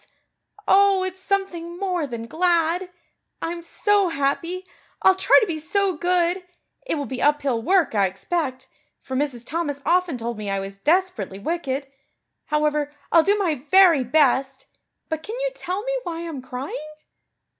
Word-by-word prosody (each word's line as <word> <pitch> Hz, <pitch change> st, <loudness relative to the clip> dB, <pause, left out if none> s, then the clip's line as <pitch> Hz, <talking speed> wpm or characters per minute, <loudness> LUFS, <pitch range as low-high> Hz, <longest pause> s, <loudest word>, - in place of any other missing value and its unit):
Oh, 390 Hz, -1 st, +5 dB
it's 375 Hz, 0 st, -5 dB
something 365 Hz, -3 st, -2 dB
more 360 Hz, -5 st, -1 dB
than 235 Hz, -3 st, -6 dB
glad. 340 Hz, +4 st, +1 dB, 0.5 s
I'm 340 Hz, +1 st, -4 dB
so 405 Hz, +3 st, +2 dB
happy. 335 Hz, +5 st, -1 dB, 0.4 s
I'll 380 Hz, -, +7 dB
try 380 Hz, -, +5 dB
to -, -, +2 dB
be 330 Hz, -5 st, -3 dB
so 380 Hz, +4 st, 0 dB
good. 355 Hz, +2 st, +1 dB, 0.4 s
It -, -, 0 dB
will 290 Hz, -2 st, -3 dB
be 260 Hz, -1 st, -5 dB
uphill 285 Hz, -5 st, +2 dB
work, 360 Hz, +2 st, +2 dB
I 200 Hz, -2 st, +3 dB
expect, 260 Hz, -, -3 dB, 0.4 s
for 260 Hz, -, -5 dB
Mrs. 260 Hz, -4 st, -2 dB
Thomas 300 Hz, -2 st, -2 dB
often 355 Hz, -5 st, +2 dB
told 230 Hz, -1 st, -4 dB
me 210 Hz, -1 st, -4 dB
I 195 Hz, 0 st, 0 dB
was 195 Hz, 0 st, -7 dB
desperately 360 Hz, -, 0 dB
wicked. 275 Hz, -, -2 dB, 0.6 s
However, 300 Hz, -1 st, 0 dB, 0.2 s
I'll 335 Hz, -, +7 dB
do 405 Hz, +5 st, +2 dB
my 320 Hz, -10 st, -1 dB
very 360 Hz, -7 st, +6 dB
best. 270 Hz, 0 st, +2 dB, 0.4 s
But 315 Hz, -1 st, -3 dB
can 435 Hz, +8 st, -6 dB
you -, -, -1 dB
tell 385 Hz, -3 st, -4 dB
me -, -, -2 dB
why 340 Hz, -5 st, -5 dB
I'm 295 Hz, -5 st, -6 dB
crying?" 270 Hz, +4 st, -6 dB
330 Hz, 155 wpm, -23 LUFS, 270-365 Hz, 0.6 s, I'll